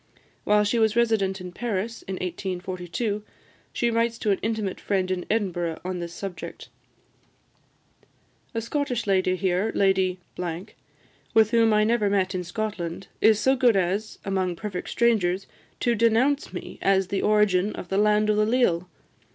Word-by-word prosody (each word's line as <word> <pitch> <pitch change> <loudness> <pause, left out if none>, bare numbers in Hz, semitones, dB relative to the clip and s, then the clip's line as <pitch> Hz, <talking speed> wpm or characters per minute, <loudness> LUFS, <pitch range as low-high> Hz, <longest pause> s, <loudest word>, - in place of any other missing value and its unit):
While 210 0 +4
she 220 +3 +1
was 220 -1 +3
resident 220 -5 +2
in 180 -1 -7
Paris, 225 +2 -3
in 190 - -5
1842, 185 +3 -3 0.5
she 235 0 0
writes 230 0 +1
to 210 - 0
an 195 - +1
intimate 215 -3 -2
friend 190 -2 0
in 180 -1 -3
Edinburgh 175 -6 -1
on 185 -1 -3
this 170 -1 -5
subject: 190 0 -7 1.9
"A 225 - 0
Scottish 250 -1 -2
lady 185 -2 +2
here, 185 +3 0
Lady, 190 -2 +2 1.2
with 220 -1 +5
whom 230 -1 +4
I 215 0 +4
never 215 -2 +2
met 190 -1 +1
in 180 -1 -2
Scotland, 180 -2 -4
is 220 -1 +5
so 265 +5 +3
good 245 -4 +4
as, 195 +3 -1
among 190 -2 0
perfect 190 -1 -5
strangers, 200 -6 +2 0.4
to 240 - +2
denounce 235 +6 +2
me - - -8
as 190 -1 +2
the 195 - -1
origin 210 -2 +3
of 175 - -8
'The 195 - +1
Land 210 0 +3
o' - - +1
the 210 - +3
Leal!' 185 -8 +2
200 Hz, 155 wpm, -25 LUFS, 185-225 Hz, 1.9 s, with